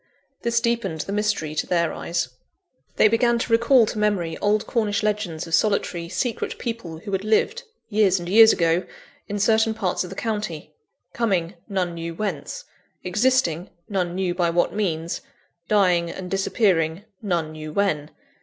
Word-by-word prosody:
This 235 0 +1
deepened 235 -9 -1
the - - -5
mystery 210 -7 0
to 155 - -2
their 170 -3 +1
eyes. 170 -7 -2 0.7
They - - +6
began 235 +2 +3
to 235 - -3
recall 235 +1 +5
to 215 - -4
memory 195 -6 0
old 210 +1 +1
Cornish 215 -3 0
legends 205 -6 -1
of 165 - -8
solitary, 175 -4 +1
secret 240 +4 -2
people 225 -9 -5
who 200 +5 -8
had 195 0 -1
lived, 220 - +1 0.3
years 205 -3 +3
and 175 -1 -6
years 220 +4 +8
ago, 170 +1 +1 0.4
in 205 - -3
certain 220 +2 +3
parts 190 -5 -1
of 180 - -7
the 195 - -8
county 205 -9 -4 0.4
coming, 190 -7 0 0.2
none 185 -3 -1
knew 165 0 -5
whence; 215 - -4 0.4
existing, 185 -4 +1 0.2
none 180 -4 -1
knew 185 -2 0
by 175 -1 +1
what 175 +1 +1
means; 170 -5 -2 0.5
dying 180 -5 +3
and 180 +1 -7
disappearing, 190 -3 +1 0.2
none 170 -7 -1
knew 155 0 -7
when. 155 -5 0
195 Hz, 160 wpm, -23 LUFS, 170-215 Hz, 0.7 s, years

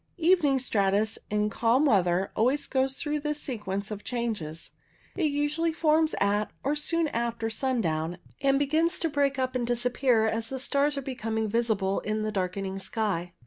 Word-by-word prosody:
Evening 325 -5 +4
stratus 210 -3 +1
in 210 0 0
calm 240 +7 +3
weather 190 -6 +2
always 255 +6 +2
goes 265 0 0
through 300 -1 -2
this 300 0 -2
sequence 210 -6 -4
of 210 -1 -6
changes. 215 -11 -4 0.4
It 360 - 0
usually 295 +3 0
forms 315 0 +2
at, 205 +1 +1
or 285 +3 +1
soon 330 +2 +1
after, 230 -2 -2
sun 255 +1 0
down, 160 -1 -1 0.2
and 275 0 +3
begins 315 +4 +1
to 330 - -1
break 280 -2 +1
up 255 -1 -1
and 240 -2 -1
disappear 245 -1 +2
as 225 0 -1
the 265 - -4
stars 280 +2 +1
are 275 - -3
becoming 225 -4 -2
visible 210 -3 +1
in 215 +1 -2
the 215 - -1
darkening 190 0 -2
sky. 195 -5 -2
235 Hz, 170 wpm, -28 LUFS, 210-285 Hz, 0.4 s, Evening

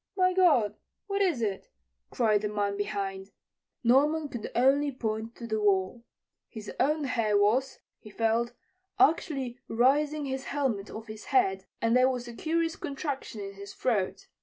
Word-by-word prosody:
"My 370 0 +3
God! 310 - +3 0.3
what 400 0 -1
is 335 -12 +1
it?" 200 -3 -3 0.4
cried 215 -4 +2
the 210 - -2
man 205 -1 -1
behind. 195 -1 -3 0.5
Norman 290 +5 +3
could 235 -5 -5
only 275 +4 +3
point 225 -2 -4
to 235 - -8
the 220 -1 -1
wall. 200 +3 +1 0.5
His 220 -2 -8
own 300 +3 +2
hair 225 -6 +1
was, 235 +7 +2 0.2
he 215 - -13
felt, 230 +2 0 0.5
actually 275 -9 +2
raising 285 +6 +2
his 265 0 -4
helmet 255 -9 -1
off 220 +1 -8
his 215 -1 -9
head, 195 -8 +2 0.2
and 230 +1 +3
there 255 +1 +5
was 250 -2 -3
a 240 - -7
curious 325 +5 -1
contraction 275 -6 -5
in 195 0 -6
his 200 0 -10
throat. 210 -7 -1
240 Hz, 160 wpm, -29 LUFS, 210-280 Hz, 0.5 s, there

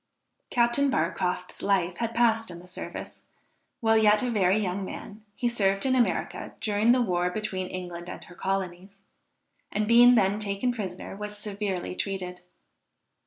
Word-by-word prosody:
Captain 240 +4 +3
Barcroft's 180 -2 -1
life 185 -3 +1
had 230 -1 -2
passed 225 -2 +3
in 175 - -7
the 175 - -13
service. 180 - -8 0.6
While 225 -1 +4
yet 210 0 +4
a 250 - 0
very 195 -3 +3
young 195 -2 -1
man, 205 +2 -8
he 245 - 0
served 195 -4 +1
in 260 - +3
America 250 -2 0
during 215 +2 +2
the 250 0 +4
war 180 -4 +1
between 190 -1 -3
England 175 -1 -6
and - - -7
her 175 - -14
colonies; 195 +1 -3 0.7
and 210 +1 0
being 240 +2 +8
then 200 -1 +3
taken 210 +4 -1
prisoner, 195 -5 -6
was 210 +1 -5
severely 200 -4 -3
treated. 180 -2 -4
200 Hz, 155 wpm, -27 LUFS, 185-225 Hz, 0.7 s, being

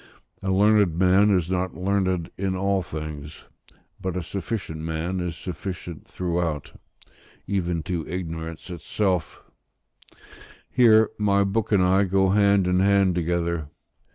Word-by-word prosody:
A 95 - -3
learned 100 -3 +3
man 95 +3 +4
is 90 -3 +1
not 95 0 -1
learned 95 -2 0
in 95 0 -2
all 95 +1 +1
things: 75 -2 -7 0.6
but 95 -1 -3
a 90 - -3
sufficient 95 -2 -4
man 80 +3 -3
is 90 -2 -3
sufficient 90 -2 -7
throughout, 85 -4 -2 0.7
even 85 -4 -1
to 85 -2 -3
ignorance 80 -1 -6
itself; 90 +2 -2 1.3
here 110 -3 +5
my 100 -1 +3
book 100 +3 -1
and 100 -3 +4
I 95 +2 +3
go 95 0 +2
hand 100 -1 +4
in 90 0 +2
hand 100 -1 +3
together. 85 -2 -1
90 Hz, 125 wpm, -24 LUFS, 85-100 Hz, 1.3 s, here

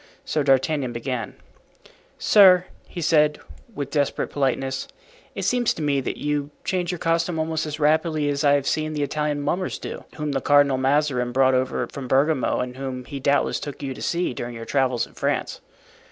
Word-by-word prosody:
So 155 - 0
D'Artagnan 135 -1 +1
began: 120 -2 -4 0.8
"Sir," 185 -3 +6 0.2
he 175 - -7
said, 150 -1 +3 0.4
with 140 -4 -4
desperate 145 -2 0
politeness, 135 -1 -1 0.5
"it - - -4
seems 245 -2 +1
to 160 - -4
me 140 -2 +1
that - - -4
you 145 -1 -2
change 180 -1 -1
your 180 - -4
costume 165 +1 0
almost 160 0 -1
as 150 0 -5
rapidly 155 0 +2
as 145 0 -1
I 145 -1 +5
have 140 -1 +1
seen 155 +1 -1
the 150 -1 -1
Italian 150 0 -1
mummers 185 +5 -1
do, - - -7
whom 150 -1 -3
the 135 -1 -1
Cardinal 145 -2 +4
Mazarin 135 -2 +1
brought 130 +1 +3
over 130 0 0
from 135 -2 -8
Bergamo 135 +1 +2
and 125 0 -5
whom 130 -2 -5
he 140 - -6
doubtless 140 +2 +1
took 145 -1 -7
you 135 -1 -3
to - - -11
see 175 -5 -1
during 120 0 -6
your 115 0 -7
travels 130 -3 +1
in - - -20
France." - - -2
145 Hz, 185 wpm, -23 LUFS, 130-155 Hz, 0.8 s, Sir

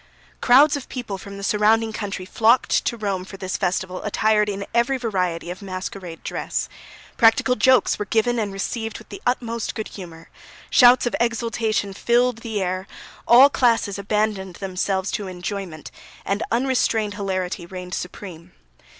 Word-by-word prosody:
Crowds 275 +5 +6
of 285 - -7
people 225 -7 -5
from 200 0 -9
the 200 - -8
surrounding 220 +2 +2
country 200 -3 -5
flocked 225 +5 +3
to 235 - -1
Rome 200 -4 -2
for 195 +1 -10
this 185 -1 -4
festival 185 0 -2
attired 210 0 +2
in 200 0 -4
every 235 +3 +2
variety 180 -8 -2
of 180 - -8
masquerade 185 -3 -7
dress; - - -3 0.5
practical 235 +2 +4
jokes 255 0 +3
were 210 - -2
given 230 +3 +1
and 210 -2 -2
received 225 +3 -4
with 220 - -15
the 200 - -9
utmost 235 -2 -2
good 220 - -4
humour, 165 -4 -11 0.4
shouts 245 0 +6
of 240 - -1
exultation 230 -3 -1
filled 240 +3 +1
the 225 -3 -4
air, 185 +1 -3 0.4
all 250 +4 +9
classes 230 -7 +1
abandoned 200 -2 -1
themselves 190 0 -2
to 205 - -3
enjoyment, 180 -3 -6 0.3
and 200 +2 -1
unrestrained 235 -4 +1
hilarity 185 -3 -3
reigned 180 0 -8
supreme. 180 -2 -7
205 Hz, 150 wpm, -22 LUFS, 190-230 Hz, 0.5 s, all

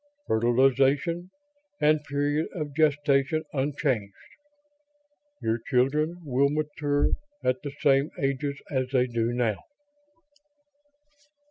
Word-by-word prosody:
Fertilization 135 +9 +2 0.5
and 150 0 +3
period 145 +2 0
of 150 -4 -4
gestation 145 0 +2
unchanged. 135 -7 -1 1.3
Your 115 +1 0
children 150 +7 +1
will 140 +1 +2
mature 145 -1 0 0.3
at 125 0 +1
the 145 - -5
same 140 +1 +3
ages 140 +1 -1
as 130 -2 0
they 125 -2 +3
do 115 -1 -1
now." 120 -4 0
140 Hz, 95 wpm, -27 LUFS, 125-150 Hz, 1.3 s, and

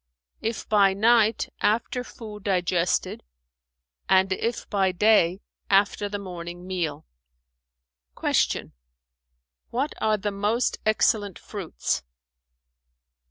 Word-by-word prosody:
"If 225 +1 -3
by 200 -2 +4
night, 225 +1 +3
after 235 +3 +1
food 215 -4 -10
digested 180 -2 0 0.9
and 190 0 +4
if 230 +4 -3
by 195 -3 +1
day, 190 -1 +3 0.3
after 200 +1 +2
the 205 - -3
morning 175 -2 -7
meal." 165 -5 -3 1.1
Q - - +1 1.0
"What 275 +5 -1
are 215 -1 +2
the 205 +1 -2
most 210 +4 0
excellent 210 -3 +2
fruits?" 195 -6 -3
205 Hz, 95 wpm, -25 LUFS, 185-220 Hz, 1.1 s, by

